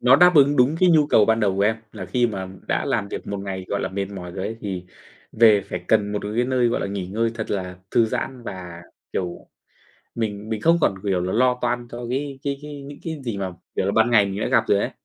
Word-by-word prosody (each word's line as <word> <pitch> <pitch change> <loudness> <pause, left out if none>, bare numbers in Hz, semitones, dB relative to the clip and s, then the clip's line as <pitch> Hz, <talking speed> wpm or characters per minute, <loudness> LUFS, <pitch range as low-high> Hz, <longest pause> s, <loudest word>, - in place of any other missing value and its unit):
nó 125 +2 +6
đáp 180 +2 +6
ứng 145 0 +5
đúng 130 +5 +4
cái 185 - +6
nhu 155 -3 +5
cầu 110 -7 +5
ban 110 +1 +2
đầu 100 -3 +2
của 100 - +2
em, 110 +2 +3 0.2
là - - -7
khi 125 -2 +2
mà 95 -4 -4 0.2
đã - - 0
làm 100 - -1
việc - - -6
một 100 - -3
ngày, 95 -1 -5
gọi 100 - -1
là, - - -2
mệt 100 0 -3
mỏi 90 -3 -7
rồi 95 +1 -4
ấy, 115 - -5
thì 95 -3 -4 0.5
về 110 -2 +6
phải - - -6
cần 105 0 +3
một 105 - 0 0.2
cái 120 - +3
nơi, 125 -1 +2
gọi - - 0
là, - - -1
nghỉ 100 -2 -4
ngơi 115 +4 0
thật 110 -1 -5
là 90 -2 -3
thư 115 - +4
giãn 125 +3 -4
và, 90 -6 -8 0.3
kiểu, 90 -2 -4 0.7
mình 105 -2 -3
mình 110 -1 -2
không 170 +5 +4
còn, 100 - +3
kiểu 95 -3 0
là, 90 +1 -2
lo 125 +2 +3
toan 120 0 -1
cho 120 0 -6
cái 135 +1 -3
cái 140 -1 -2
cái 145 -1 -8
những 140 +1 -10
cái 160 -3 -4
gì 115 -4 -3
mà, 95 -2 -3 0.2
kiểu - - +1
là, 100 - +1
ban 110 +3 +3
ngày 105 -4 +5
mình 100 +1 -4
đã - - 0
gặp - - +3
rồi - - +4
ấy. - - -1
110 Hz, 265 wpm, -23 LUFS, 100-125 Hz, 0.7 s, nó